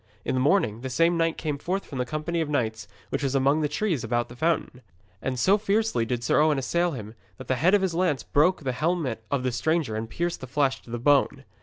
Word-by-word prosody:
In - - -1
the 130 - +1
morning 130 - +2
the 130 - -4
same 165 +7 +2
knight 165 -1 +1
came 150 -3 -3
forth 190 +6 -2
from 135 - -7
the 125 - -1
company 155 +4 -2
of 155 - -2
knights 110 -6 -1 0.2
which - - -2
was 140 -1 -1
among 140 +3 +3
the 150 - 0
trees 165 - -1
about 120 +1 -1
the 120 - -11
fountain. 155 -3 -1 0.4
And 130 -1 -2
so 195 +11 +3
fiercely 210 - +1
did 120 -1 -2
Sir 135 - +3
Owen 155 -2 +3
assail 170 +6 0
him 110 -4 -7 0.2
that - - -10
the 130 - 0
head 180 +5 +5
of 200 - +2
his 185 -3 0
lance 165 -6 0
broke 155 +3 +2
the 130 - -1
helmet 145 -5 -1
of 140 -3 -1
the 130 - 0
stranger 140 0 0
and 110 +1 -4
pierced 170 +7 -3
the 130 - -7
flesh 135 0 0
to - - -17
the 120 - -3
bone. 140 +1 +2
145 Hz, 250 wpm, -26 LUFS, 125-170 Hz, 0.4 s, head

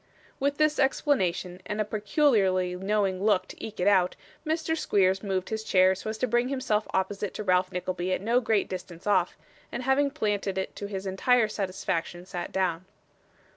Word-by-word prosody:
With 280 +1 0
this 305 0 +2
explanation, 190 - +1
and 210 +2 -4
a 215 - +1
peculiarly 205 - +2
knowing 195 0 0
look 200 -3 +2
to - - -10
eke 220 -1 -7
it 180 - +1
out, 185 -3 +4 0.3
Mr. 320 0 -1
Squeers 190 - +2
moved 190 -3 -2
his 220 0 -3
chair 185 -3 +4
so 200 +3 -6
as 220 - -4
to 255 - 0
bring 240 +1 +2
himself 255 -6 -1
opposite 195 +1 -2
to - - -4
Ralph 185 -1 +2
Nickleby 180 0 -3
at - - +1
no 235 +4 +2
great 220 -3 +1
distance 180 -1 -8
off; 190 -4 +2 0.3
and 240 - -4
having 270 +2 +3
planted 205 -8 -1
it 190 - -3
to 205 - -4
his 195 -1 -5
entire 220 +5 +3
satisfaction, 185 -4 -3
sat 180 -2 -5
down. 185 -2 -1
200 Hz, 180 wpm, -27 LUFS, 185-230 Hz, 0.3 s, out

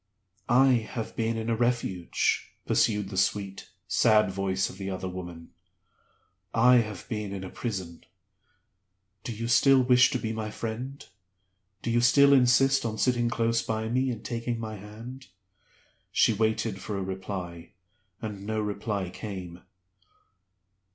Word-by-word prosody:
"I 130 +3 +6 0.2
have 115 -2 -4
been 115 0 -1
in 110 0 -4
a 115 - +1
Refuge," 115 -7 0
pursued 105 -3 +1
the 95 - -5
sweet, 95 +1 -1 0.2
sad 105 -4 +4
voice 95 0 -1
of 95 - -11
the 95 0 -4
other 95 -1 -4
woman. 85 -2 -8 1.0
"I 125 +2 +6
have 110 -5 -2
been 105 -3 -4
in 95 -1 -5
a 95 - -7
Prison. 95 -8 -5 1.2
Do - - -4
you 115 +1 -4
still 135 +2 +5
wish 125 0 +5
to - - -1
be 110 -2 -3
my 110 -1 -4
friend? 120 +6 -6 0.8
Do 115 - -1
you 120 +1 +3
still 140 +3 +6
insist 135 +1 +4
on 110 -2 -3
sitting 120 0 +2
close 115 0 +1
by 110 0 -3
me 130 +2 +1
and 115 -3 -5
taking 115 0 -3
my 110 -1 -5
hand?" 115 +6 -10 0.8
She 115 - +4
waited 110 -1 0
for 105 - -4
a 95 - -2
reply, 95 -2 -6 0.5
and 105 -3 -5
no 110 0 -1
reply 100 -3 -3
came. 90 -5 -7
110 Hz, 145 wpm, -27 LUFS, 95-120 Hz, 1.2 s, I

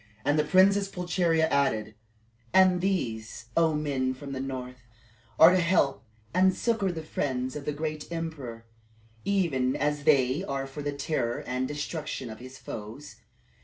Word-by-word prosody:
And 145 +1 +3
the - - +4
Princess 195 +5 +4
Pulcheria 175 -3 +1
added, 110 -6 +1 0.6
"And 185 -1 +6
these, 115 - -2
O 165 -2 +3
men 135 -4 -1
from 140 +1 -8
the 135 - -4
north, 125 -2 -5 0.6
are 165 +2 +9
to 185 - +3
help 170 -8 +2 0.3
and 185 +1 +4
succor 220 -5 0
the 160 -2 -6
friends 130 -4 -2
of 145 -1 -6
the - - 0
great 155 +1 -4
emperor, 145 -9 -5 0.6
even 155 -11 +1
as 150 0 -1
they 140 +1 +3
are 135 -6 -3
for 135 +2 -7
the 145 0 -2
terror 140 -4 -2
and 130 +1 -1
destruction 150 -3 -4
of 110 - -10
his 130 +2 -10
foes. 110 +3 -8
145 Hz, 155 wpm, -28 LUFS, 130-170 Hz, 0.6 s, are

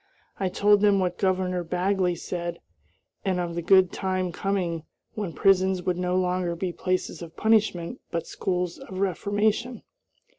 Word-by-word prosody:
I 190 - 0
told 205 +2 +4
them 205 -1 +5
what 180 -2 -1
Governor 185 -2 +1
Bagley 180 +1 0
said, 170 0 -4 0.7
and 185 -2 0
of 175 -1 -2
the 170 - -2
good 190 +1 +5
time 185 -2 -1
coming 175 -3 -1 0.3
when 205 -6 -3
prisons 190 0 +3
would 180 0 -1
no 180 0 0
longer 180 -1 0
be 175 +1 -3
places 185 0 -2
of 165 -1 -10
punishment 215 -2 +1
but 165 -1 -3
schools 180 -2 -2
of 185 - -9
reformation. 205 +5 0
185 Hz, 150 wpm, -26 LUFS, 175-195 Hz, 0.7 s, them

